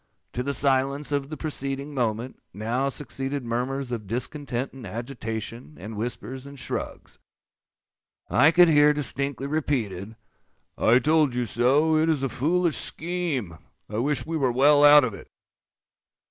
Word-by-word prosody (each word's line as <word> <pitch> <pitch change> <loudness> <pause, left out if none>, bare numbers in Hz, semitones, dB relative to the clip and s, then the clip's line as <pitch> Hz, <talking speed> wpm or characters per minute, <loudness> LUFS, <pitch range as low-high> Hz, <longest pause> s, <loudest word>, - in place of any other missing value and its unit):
To 125 - -2
the 140 +2 -2
silence 140 +1 +1
of 140 -1 -1
the 155 - -6
preceding 140 -2 -4
moment, 120 -1 -2
now 120 +6 -1
succeeded 135 0 -4
murmurs 125 +3 -2
of 110 -4 -4
discontent 125 +3 -3
and 135 -2 -11
agitation, 115 +3 -6
and 110 +1 -7
whispers 125 +4 -5
and 140 0 -11
shrugs. - - -6 1.1
I 145 +5 +5
could 175 +2 +6
hear 150 -2 +5
distinctly 140 -1 -3
repeated, 115 - -2 0.6
"I 115 +2 +4
told 150 -1 +2
you 125 -1 0
so,—it 150 +8 +2
is 150 -4 +1
a 135 - 0
foolish 165 +6 +1
scheme.—I 145 - -4
wish 135 0 0
we 165 +1 -2
were 130 -4 +1
well 145 +4 +5
out 145 0 +9
of 115 -4 -1
it." - - -11
135 Hz, 140 wpm, -25 LUFS, 120-145 Hz, 1.1 s, out